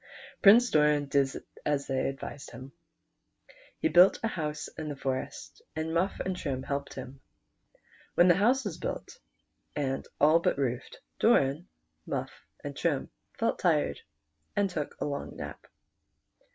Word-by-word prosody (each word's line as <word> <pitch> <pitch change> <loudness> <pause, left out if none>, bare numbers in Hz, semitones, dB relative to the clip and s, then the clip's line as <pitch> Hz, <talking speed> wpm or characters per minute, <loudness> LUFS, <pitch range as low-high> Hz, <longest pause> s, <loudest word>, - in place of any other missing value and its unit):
Prince 235 +4 +7
Doran 150 -1 +4
did 140 -1 +2 0.3
as 145 -2 0
they 130 -1 0
advised 135 +1 -7
him. 130 +3 -10 1.1
He 320 - +1
built 185 - +6
a 225 - +1
house 150 -5 -3
in 155 -1 -6
the 145 - -4
forest, 135 -1 -4
and 160 +1 -2
Muff 180 +4 0
and 190 -1 -2
Trim 135 -6 -3
helped 140 0 -3
him. 130 +1 -8 0.9
When 175 - +6
the 175 - +7
house 240 +7 +3
was 195 -6 -4
built, - - -5 0.6
and 135 -2 -2
all 155 +3 +6
but 170 - +1
roofed, 125 -3 -2 0.2
Doian, 140 +6 +3 0.4
Muff, - - -2 0.3
and - - -5
Trim - - -1 0.3
felt - - 0
tired, - - +1 0.5
and 200 -2 +1
took 150 -4 -4
a - - -1
long 140 -1 -4
nap. - - -8
150 Hz, 145 wpm, -29 LUFS, 135-180 Hz, 1.1 s, Prince